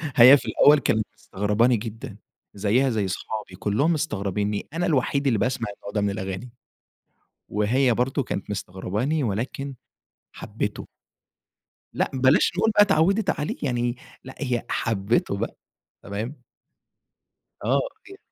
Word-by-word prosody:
هي 130 +4 +9
في - - -9
الأول 150 0 +5
كانت 110 -5 +1
مستغرباني 105 +5 +1
جدًا، 110 +1 -7 0.4
زيها 110 +7 +2
زي 110 -5 0
أصحابي 95 +1 -5
كلهم 140 +11 +1
مستغربينّي، 105 - -2
أنا 175 +2 0
الوحيد 140 -1 +1
اللي 115 -6 +2
باسمع 120 +1 -1
النوع 100 - -9
ده 105 - +1
من 100 - +1
الأغاني. 100 +4 -5 1.0
وهي 120 +5 +2
برضو 130 +4 0
كانت 100 - -5
مستغرباني 105 - -2
ولكن 125 +6 -3 0.6
حبته. - - -5 1.1
لا - - 0
بلاش 130 +1 +4
نقول 225 +2 +3
بقى 205 -1 +6
اتعودت 195 +2 +3
عليه، 150 - -2
يعني 120 -2 -1 0.3
لا، 130 - -9
هي 125 -5 -1
حبته 105 -2 0
بقى، - - -4 0.5
تمام. 115 +7 -6 1.2
آه، - - +3 0.2
أكيد، 390 +1 -13
120 Hz, 130 wpm, -24 LUFS, 105-140 Hz, 1.2 s, هي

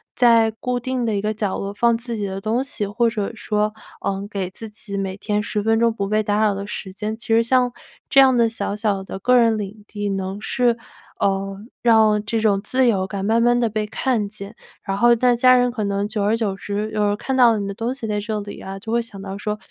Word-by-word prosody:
在 230 -2 +5
固 250 -1 -1
定 255 0 -2
的 220 -2 0
一 200 - -1
个 215 +1 -1
角 205 -2 -2
落 200 0 -4
放 235 +2 +2
自 235 0 -5
己 205 - -2
的 190 0 -4
东 225 +5 0
西， 270 -6 -3
或 230 +4 +1
者 210 -3 -3
说， 210 -1 -1 0.3
呃， 195 +1 -2
给 195 -3 -3
自 220 +4 -9
己 210 -1 -7
每 190 -1 -3
天 210 0 -1
10 210 0 -1
分 225 +1 +2
钟 230 0 +3
不 200 -3 -3
被 215 +1 +2
打 205 -1 0
扰 215 -2 +3
的 200 +1 -5
时 195 -2 -5
间， 210 +2 -4
其 230 - -11
实 225 0 +4
像 250 +1 +2 0.4
这 275 - +5
样 265 -1 +6
的 235 -1 +4
小 205 -2 -3
小 205 -2 -1
的 190 - -7
个 250 +6 +3
人 230 -2 +4
领 205 0 -6
地 205 -1 -4
能 195 0 -3
是， 240 0 +1 0.4
呃， 195 0 0 0.2
让 220 -3 +4
这 225 +2 -1
种 205 -3 +2
自 255 +5 +1
由 190 -5 +1
感 195 0 -4
慢 225 +2 +3
慢 240 +1 +3
地 235 -2 +1
被 215 0 -2
看 225 -1 -1
见， 200 0 -9 0.3
然 195 -1 -2
后 240 +3 +5
那 245 +1 +3
家 255 +1 +6
人 245 0 +3
可 220 -3 -3
能 200 0 -1
久 210 - -2
而 210 +2 +2
久 215 -4 -1
之， 205 +2 -4
有 210 -1 0
人 205 - +1
看 265 +5 -3
到 235 -3 +6
你 200 - -3
的 200 - -4
东 230 +5 -3
西 270 - -6
在 210 -1 -1
这 215 +1 -3
里 205 0 -8
啊， 195 0 -7
就 220 +3 -7
会 235 +1 +2
想 225 -4 -9
到 195 0 -6
说： 210 +1 -3
215 Hz, 270 characters per minute, -21 LUFS, 200-235 Hz, 0.4 s, 样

